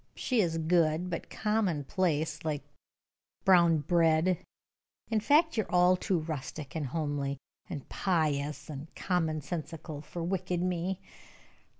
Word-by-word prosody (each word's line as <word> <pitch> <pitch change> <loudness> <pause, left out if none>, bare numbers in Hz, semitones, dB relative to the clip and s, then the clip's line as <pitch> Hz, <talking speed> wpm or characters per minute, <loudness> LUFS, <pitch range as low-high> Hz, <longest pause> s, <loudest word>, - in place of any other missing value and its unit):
She 250 -4 +1
is 165 -3 0
good, 165 +1 +2
but 170 - -4
commonplace, 170 -5 0
like 150 -2 -2 0.8
brown 170 -4 +6
bread. 165 +2 +3 0.7
In 220 - +3
fact, 300 +6 +4
you 220 - +3
are - - -15
all 180 0 +5
too 180 -2 0
rustic, 155 -2 -6
and 155 -3 -1
homely, 145 -1 -2 0.3
and 150 -7 -6
pious, 150 -5 0
and 150 0 -7
common 160 -4 0
sensical 155 0 -6
for 170 +1 -6
wicked 180 0 -1
me. 180 +1 -1
165 Hz, 125 wpm, -30 LUFS, 155-180 Hz, 0.8 s, brown